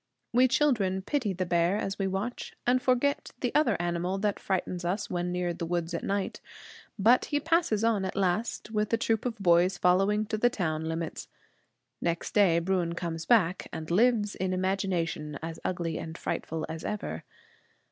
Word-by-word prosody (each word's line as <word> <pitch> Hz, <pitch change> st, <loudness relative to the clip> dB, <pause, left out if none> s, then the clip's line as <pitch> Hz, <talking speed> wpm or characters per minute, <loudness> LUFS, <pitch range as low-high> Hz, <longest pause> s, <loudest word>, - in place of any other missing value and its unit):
We 250 Hz, +2 st, +6 dB
children 235 Hz, -9 st, +2 dB
pity 250 Hz, -4 st, 0 dB
the 185 Hz, 0 st, -2 dB
bear, 175 Hz, +2 st, +2 dB
as 195 Hz, -1 st, -3 dB
we 195 Hz, -, +1 dB
watch, 195 Hz, +6 st, -4 dB
and 255 Hz, +1 st, +3 dB
forget 255 Hz, +3 st, +1 dB
the 245 Hz, -, -1 dB
other 285 Hz, -8 st, +3 dB
animal 175 Hz, +2 st, -1 dB
that 205 Hz, 0 st, -1 dB
frightens 185 Hz, -2 st, -2 dB
us 200 Hz, +4 st, -2 dB
when 175 Hz, 0 st, -1 dB
near 180 Hz, -1 st, -1 dB
the 170 Hz, 0 st, -5 dB
woods 170 Hz, 0 st, -2 dB
at 170 Hz, -, -3 dB
night. 200 Hz, 0 st, -2 dB, 0.6 s
But 230 Hz, +5 st, +5 dB
he 290 Hz, -, 0 dB
passes 310 Hz, -9 st, +1 dB
on 225 Hz, -4 st, +2 dB
at 190 Hz, -, -3 dB
last, 200 Hz, +4 st, -1 dB
with 210 Hz, -1 st, 0 dB
a -, -, +5 dB
troop 225 Hz, +1 st, 0 dB
of 230 Hz, -2 st, -4 dB
boys 180 Hz, -1 st, +3 dB
following 195 Hz, +4 st, +3 dB
to 215 Hz, 0 st, -3 dB
the 245 Hz, -, +4 dB
town 160 Hz, -8 st, -2 dB
limits. 160 Hz, 0 st, -4 dB, 0.7 s
Next 170 Hz, -1 st, -2 dB
day 195 Hz, -6 st, +5 dB
Bruin 175 Hz, -1 st, 0 dB
comes 165 Hz, -1 st, -4 dB
back, 190 Hz, -6 st, +3 dB
and 160 Hz, +1 st, -6 dB
lives 210 Hz, +1 st, +3 dB
in 185 Hz, 0 st, -2 dB
imagination 185 Hz, -5 st, -1 dB
as 165 Hz, 0 st, -5 dB
ugly 170 Hz, -3 st, -2 dB
and 160 Hz, +1 st, -7 dB
frightful 160 Hz, 0 st, -3 dB
as 160 Hz, 0 st, -6 dB
ever. 210 Hz, 0 st, -4 dB
190 Hz, 175 wpm, -29 LUFS, 170-215 Hz, 0.7 s, We